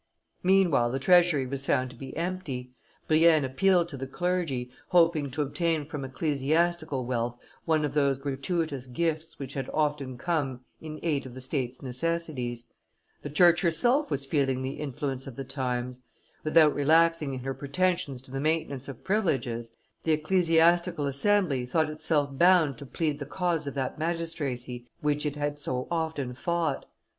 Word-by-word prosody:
Meanwhile 180 -10 +4
the 130 - -1
treasury 170 -1 +4
was 140 +1 -4
found 130 0 +1
to - - -13
be 135 +3 -8
empty; 165 -8 -4 0.4
Brienne 155 -2 +5
appealed 175 +6 +3
to 140 - -7
the 135 0 -5
clergy, 155 -6 -2 0.2
hoping 165 -5 +3
to 150 +3 -1
obtain 160 +1 -1
from 145 -2 -6
ecclesiastical 150 +1 0
wealth 120 -1 -2 0.3
one 155 -2 +2
of 145 - -3
those 140 -2 +2
gratuitous 140 0 -2
gifts 160 +4 -2
which 135 -1 -7
had 135 -2 -4
often 145 -4 -1
come 135 -4 -1 0.2
in 155 -1 -7
aid 145 -5 0
of 125 - -11
the - - -7
State's 130 -1 -3
necessities. 130 -3 -2 0.6
The 145 - -6
Church 170 +3 +5
herself 240 - +2
was 140 0 -2
feeling 135 -2 0
the 130 +1 -4
influence 135 -2 -4
of 130 - -8
the 135 - -5
times. 125 -1 -3 0.4
Without 155 -1 +5
relaxing 160 -1 +3
in 130 - -6
her 135 +1 -3
pretensions 140 -1 -1
to 130 - -13
the 135 - -3
maintenance 155 -3 -1
of 135 -4 -9
privileges, 125 - -1 0.3
the 160 - +2
ecclesiastical 170 0 +3
assembly 140 -1 +1
thought 155 +4 +1
itself 150 -2 0
bound 170 -3 +5
to 140 - -8
plead 150 0 -2
the 140 - -6
cause 170 -1 -1
of 140 - -4
that 135 +1 -3
magistracy 145 -7 -3
which 150 0 +1
it 145 - -3
had 145 0 -2
so, 130 -3 -2
often 160 -6 -2
fought. 170 +4 -1
145 Hz, 160 wpm, -28 LUFS, 130-165 Hz, 0.6 s, Brienne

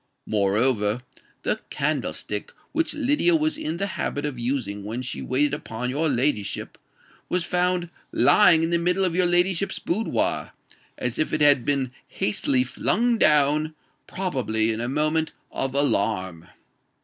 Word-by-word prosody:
Moreover, 105 +2 +1 0.4
the - - 0
candlestick 105 0 -2 0.2
which 325 -1 -1
Lydia 295 +4 +2
was 315 0 +1
in 160 +2 -4
the 200 - -1
habit 150 -6 -3
of 140 -4 -4
using 120 -5 -2
when 115 +5 -4
she 125 - -4
waited 140 +3 +1
upon 125 -3 -3
your 155 +4 0
ladyship, 125 -5 -1 0.5
was 180 -1 0
found 180 -1 0 0.2
lying 165 -6 +5
in 165 - 0
the 170 - +2
middle 180 +3 +1
of 180 - 0
your 180 +1 +2
ladyship's 175 +2 +1
boudoir, 215 +6 -1 0.4
as 125 -1 -2
if 155 - 0
it 155 - 0
had 145 -4 +5
been 135 -3 0 0.2
hastily 125 +5 +1
flung 230 - +1
down—probably 150 - +1
in 110 - -4
a 120 - -2
moment 155 +3 0 0.2
of 135 0 -3
alarm." 100 - 0
145 Hz, 140 wpm, -24 LUFS, 120-175 Hz, 0.5 s, lying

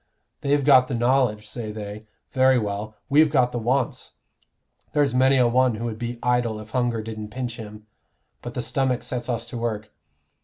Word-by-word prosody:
They've 140 -1 +1
got 130 -3 +6
the 130 - -2
knowledge, 120 -3 +1
say 110 -1 -6
they. 105 0 -8 0.2
Very 130 0 +4
well, 105 -1 -3
we've 150 +2 +5
got 130 -4 +2
the 120 - -3
wants. 125 +3 -1 0.8
There's 145 -3 +2
many 130 +1 +4
a 125 -2 +4
one 125 -1 +2
would 110 -2 -4
be 120 0 -4
idle 120 -3 +1
if 110 0 -11
hunger 120 -3 0
didn't 110 -1 -6
pinch 125 0 -5
him; 105 -1 -10 0.6
but - - -7
the - - -2
stomach 130 -2 0
sets 125 -2 -4
us 120 -1 -2
to 120 - -5
work. 110 -2 -3
120 Hz, 180 wpm, -24 LUFS, 110-130 Hz, 0.8 s, got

